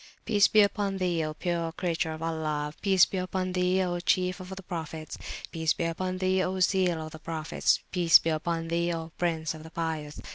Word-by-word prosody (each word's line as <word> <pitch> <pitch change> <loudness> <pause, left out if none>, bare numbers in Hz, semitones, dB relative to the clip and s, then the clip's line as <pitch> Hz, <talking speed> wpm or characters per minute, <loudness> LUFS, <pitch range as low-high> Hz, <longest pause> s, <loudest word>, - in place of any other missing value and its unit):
Peace 205 -3 +5
be 215 - +5
upon 200 -1 +1
Thee, 175 -3 0
O 155 0 -4
pure 170 -1 -2
Creature 165 -2 -1
of 155 +1 -7
Allah! 155 -2 -2
Peace 190 -3 +5
be 190 - -5
upon 185 0 -2
Thee, 180 +1 +2
O 175 -1 -1
Chief 185 +1 +1
of 185 0 -9 0.2
Prophets! 160 -3 -5 0.4
Peace 160 -2 +1
be - - -3
upon 185 +2 -2
Thee, 185 0 +2
O 185 +1 -1
Seal 185 -2 +2
of 155 - -9
the 155 - -10
Prophets! 160 0 0
Peace 175 -3 +7
be 165 - -1
upon 165 +1 -2
Thee, 170 +1 +1
O 165 0 -6
Prince 160 -3 0
of 155 - -10
the 160 - -10
Pious! 160 -2 -4
170 Hz, 205 wpm, -28 LUFS, 160-185 Hz, 0.4 s, Peace